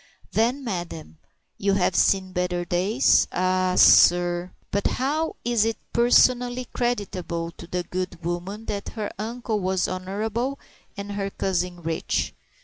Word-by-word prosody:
"Then, 245 +6 +1
madam, 175 -7 -5 0.4
you 200 0 +2
have 185 -2 +1
seen 190 -1 +3
better 180 -1 -1
days?" 195 +9 +3
"Ah, 185 0 +1
sir 175 0 +5
" - - -39
But 200 0 +1
how 300 +5 -1
is 235 -3 +2
it 225 0 -1 0.2
personally 245 +1 +3
creditable 185 -8 -2
to 170 - -12
the 180 0 -2
good 180 -2 -5
woman 180 +6 -4
that 200 -2 -4
her 210 -1 -3
uncle 225 0 -3
was 190 -1 0
honorable 215 +8 -3 0.4
and 200 0 -5
her 200 -1 -2
cousin 180 -2 -2
rich? 160 0 -1
195 Hz, 140 wpm, -24 LUFS, 180-225 Hz, 0.4 s, sir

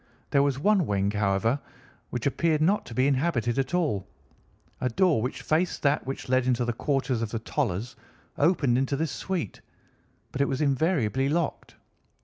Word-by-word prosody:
There 140 - +4
was 140 -2 +1
one 195 +2 +2
wing, 100 0 +1
however, 105 +5 +1 0.5
which 120 -2 -4
appeared 155 +2 +1
not 190 +7 +2
to 115 - -8
be 130 - +3
inhabited 135 -4 +1
at 135 +5 -1
all. 145 - 0 0.7
A 125 - 0
door 160 - +2
which 125 +4 -4
faced 165 +3 0
that 140 -1 +1
which 135 - -5
led 130 0 +2
into 125 -1 +1
the 120 - -1
quarters 135 -1 -1
of 115 - -2
the 115 - -3
Tollers 115 -1 -2 0.4
opened 140 -6 +2
into 135 +1 0
this 155 0 -1
suite, 180 - -4 0.7
but 135 - -2
it 140 - +3
was 135 -1 -1
invariably 140 - +1
locked. 165 +1 -2
135 Hz, 170 wpm, -27 LUFS, 120-155 Hz, 0.7 s, There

